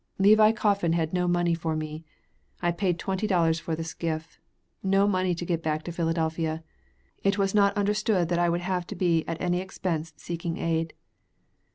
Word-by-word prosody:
Levi 215 Hz, +2 st, +6 dB
Coffin 200 Hz, -6 st, +1 dB
had 165 Hz, -1 st, 0 dB
no 180 Hz, -1 st, +1 dB
money 175 Hz, -1 st, +2 dB
for 165 Hz, -1 st, -2 dB
me. 155 Hz, 0 st, -5 dB, 0.6 s
I 175 Hz, -1 st, +1 dB
paid 175 Hz, 0 st, 0 dB
twenty 190 Hz, +4 st, -2 dB
dollars 165 Hz, -4 st, +2 dB
for 165 Hz, -1 st, -3 dB
the 165 Hz, -, -4 dB
skiff. 160 Hz, -1 st, -4 dB, 0.4 s
No 195 Hz, +1 st, +3 dB
money 185 Hz, -2 st, +1 dB
to 175 Hz, -, -5 dB
get 170 Hz, -2 st, -1 dB
back 155 Hz, -1 st, -1 dB
to 175 Hz, -, -5 dB
Philadelphia. 165 Hz, -1 st, -1 dB, 0.6 s
It 195 Hz, +1 st, +2 dB
was 195 Hz, -1 st, +1 dB
not 200 Hz, -1 st, +3 dB
understood 205 Hz, -3 st, +1 dB
that 175 Hz, -1 st, +1 dB
I 175 Hz, 0 st, +3 dB
would 170 Hz, +1 st, 0 dB
have 180 Hz, -1 st, -2 dB
to 205 Hz, -, -6 dB
be 170 Hz, -3 st, +2 dB
at 165 Hz, -1 st, -3 dB
any 180 Hz, 0 st, 0 dB
expense 170 Hz, -4 st, -3 dB
seeking 170 Hz, -1 st, -4 dB
aid. 165 Hz, -1 st, -1 dB
175 Hz, 185 wpm, -27 LUFS, 165-190 Hz, 0.6 s, Levi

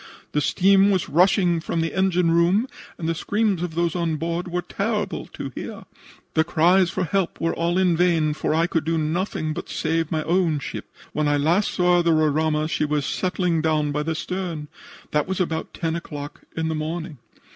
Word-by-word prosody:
The 150 Hz, -, +1 dB
steam 195 Hz, +4 st, +4 dB
was 190 Hz, -3 st, 0 dB
rushing 175 Hz, +1 st, +3 dB
from 165 Hz, 0 st, -2 dB
the 165 Hz, -, -2 dB
engine 180 Hz, -3 st, +2 dB
room, 175 Hz, +8 st, +3 dB, 0.3 s
and 160 Hz, -, -4 dB
the 165 Hz, -, +1 dB
screams 205 Hz, +1 st, 0 dB
of 175 Hz, -3 st, -4 dB
those 170 Hz, 0 st, 0 dB
on 170 Hz, -2 st, 0 dB
board 170 Hz, +3 st, -3 dB
were 175 Hz, 0 st, -2 dB
terrible 210 Hz, +1 st, -2 dB
to -, -, -7 dB
hear. -, -, -7 dB, 0.5 s
The 160 Hz, -, +3 dB
cries 175 Hz, +3 st, +3 dB
for 185 Hz, -, -2 dB
help 180 Hz, +2 st, -1 dB
were 165 Hz, -, 0 dB
all 170 Hz, +2 st, 0 dB
in 185 Hz, -2 st, +3 dB
vain, 165 Hz, -3 st, +2 dB
for 155 Hz, -, -2 dB
I 165 Hz, +1 st, +3 dB
could 165 Hz, -2 st, -1 dB
do 165 Hz, +1 st, 0 dB
nothing 155 Hz, 0 st, -1 dB
but -, -, -6 dB
save 165 Hz, 0 st, -1 dB
my 155 Hz, -1 st, 0 dB
own 170 Hz, -1 st, +2 dB
ship. 140 Hz, -, -6 dB, 0.3 s
When 150 Hz, -1 st, 0 dB
I 145 Hz, 0 st, +2 dB
last 170 Hz, +8 st, +2 dB
saw 180 Hz, -1 st, +3 dB
the 170 Hz, -1 st, +3 dB
Roraima 155 Hz, 0 st, +2 dB
she 155 Hz, -, -1 dB
was 150 Hz, -2 st, 0 dB
settling 180 Hz, -3 st, 0 dB
down 155 Hz, -2 st, +1 dB
by 150 Hz, +1 st, -1 dB
the 160 Hz, +1 st, -2 dB
stern. 170 Hz, -3 st, -4 dB, 0.4 s
That 150 Hz, -1 st, +1 dB
was 190 Hz, 0 st, -2 dB
about 165 Hz, -3 st, -2 dB
10 165 Hz, -1 st, -2 dB
o'clock 145 Hz, -3 st, -7 dB, 0.2 s
in 160 Hz, 0 st, 0 dB
the 160 Hz, -, -1 dB
morning. 155 Hz, -1 st, -4 dB
165 Hz, 200 wpm, -23 LUFS, 155-180 Hz, 0.5 s, steam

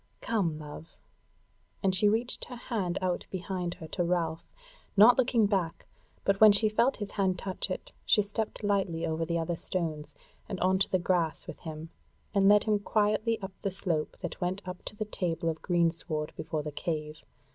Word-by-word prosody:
Come, 190 Hz, -9 st, 0 dB
love!" 155 Hz, +2 st, -10 dB, 0.9 s
And 190 Hz, -1 st, +3 dB
she 205 Hz, +3 st, +5 dB
reached 230 Hz, +3 st, 0 dB
her 250 Hz, -, -8 dB
hand 200 Hz, -7 st, -2 dB
out 180 Hz, -1 st, -1 dB
behind 180 Hz, -1 st, -3 dB
her 160 Hz, -, -9 dB
to 180 Hz, -, -1 dB
Ralph, 170 Hz, -2 st, -1 dB, 0.5 s
not 225 Hz, +4 st, +9 dB
looking 245 Hz, -4 st, +3 dB
back, 190 Hz, -5 st, -1 dB, 0.4 s
but 200 Hz, 0 st, +1 dB
when 215 Hz, -1 st, +10 dB
she 215 Hz, +2 st, +4 dB
felt 235 Hz, +5 st, +2 dB
his 205 Hz, -2 st, -5 dB
hand 190 Hz, -2 st, +1 dB
touch 190 Hz, +1 st, -3 dB
it, -, -, -5 dB
she 210 Hz, -, +4 dB
stepped 215 Hz, +2 st, -4 dB
lightly 195 Hz, -5 st, 0 dB
over 160 Hz, 0 st, -1 dB
the 170 Hz, +1 st, -1 dB
other 165 Hz, +1 st, -1 dB
stones, 160 Hz, -4 st, -2 dB, 0.3 s
and 190 Hz, -, -4 dB
on 185 Hz, +1 st, +3 dB
to -, -, +2 dB
the 185 Hz, -, +3 dB
grass 175 Hz, -3 st, 0 dB
with -, -, -7 dB
him, 160 Hz, 0 st, -7 dB, 0.4 s
and 195 Hz, -1 st, +5 dB
led 210 Hz, 0 st, +6 dB
him 210 Hz, -2 st, +2 dB
quietly 215 Hz, +2 st, +1 dB
up 190 Hz, -, -5 dB
the 200 Hz, -, 0 dB
slope 180 Hz, -5 st, -1 dB
that 175 Hz, -, -5 dB
went 185 Hz, +2 st, -2 dB
up 180 Hz, 0 st, -6 dB
to -, -, -4 dB
the 215 Hz, 0 st, -3 dB
table 170 Hz, -5 st, -1 dB
of 160 Hz, -1 st, -4 dB
greensward 165 Hz, -3 st, 0 dB
before 155 Hz, -1 st, -3 dB
the 150 Hz, -, -4 dB
cave. 155 Hz, 0 st, -4 dB
185 Hz, 190 wpm, -30 LUFS, 165-205 Hz, 0.9 s, when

